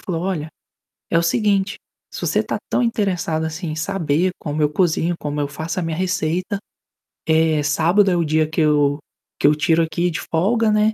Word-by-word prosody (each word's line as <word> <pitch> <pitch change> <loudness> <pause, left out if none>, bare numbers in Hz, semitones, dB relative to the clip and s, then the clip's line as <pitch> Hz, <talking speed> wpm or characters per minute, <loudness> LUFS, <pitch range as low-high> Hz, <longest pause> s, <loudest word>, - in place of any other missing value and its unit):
falou: 170 -2 -3
"Olha, 170 -5 -2 0.6
é 165 - +2
o - - +4
seguinte, 200 +1 +1 0.4
se - - -7
você - - +2
tá - - -3
tão - - +1
interessado 185 -8 0
assim 160 +2 -4
em 155 - -4
saber 170 0 0
como 150 0 -3
eu 150 - +3
cozinho, 170 +1 +1
como 145 0 -3
eu 145 - -1
faço 160 +5 -4
a - - -2
minha 165 -1 -3
receita, 185 +1 -1 0.7
eh, 160 -1 +3
sábado 170 +7 +3
é - - +2
o 170 - +2
dia 155 0 +1
que 160 +1 -1
eu 145 -1 +3 0.4
que - - +4
eu 150 - +4
tiro 165 +2 +2
aqui 170 +3 0
de 160 - -4
folga 215 +7 +1
né, 215 +1 +3
165 Hz, 200 wpm, -20 LUFS, 155-185 Hz, 0.7 s, o